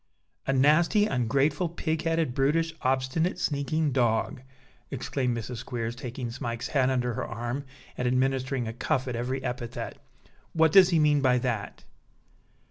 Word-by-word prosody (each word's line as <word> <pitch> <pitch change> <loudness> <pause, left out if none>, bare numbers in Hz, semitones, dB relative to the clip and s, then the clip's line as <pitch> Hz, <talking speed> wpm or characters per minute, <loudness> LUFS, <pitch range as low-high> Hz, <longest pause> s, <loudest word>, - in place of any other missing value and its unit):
"A - - +2
nasty, 155 +10 +4
ungrateful, 140 - +1
pig 160 -1 -2
headed, 165 -5 0
brutish, 160 +5 +1
obstinate, 130 +7 0
sneaking 150 -2 0
dog," 125 +2 +1 0.5
exclaimed 130 -2 -2
Mrs. 115 +2 -5
Squeers, 120 -1 -4
taking 120 -1 -5
Smike's 120 0 -4
head 135 -3 +2
under 125 -2 0
her 130 +2 -3
arm 120 +4 -4 0.3
and 125 - 0
administering 130 0 0
a 110 - -4
cuff 130 +2 -1
at 125 - -3
every 130 +3 -3
epithet; 125 -2 -5 0.5
"what 160 -1 +4
does 185 +1 +8
he 170 - +3
mean 150 -2 +3
by 130 -2 +4
that?" 120 -4 -3
130 Hz, 145 wpm, -27 LUFS, 125-150 Hz, 0.5 s, does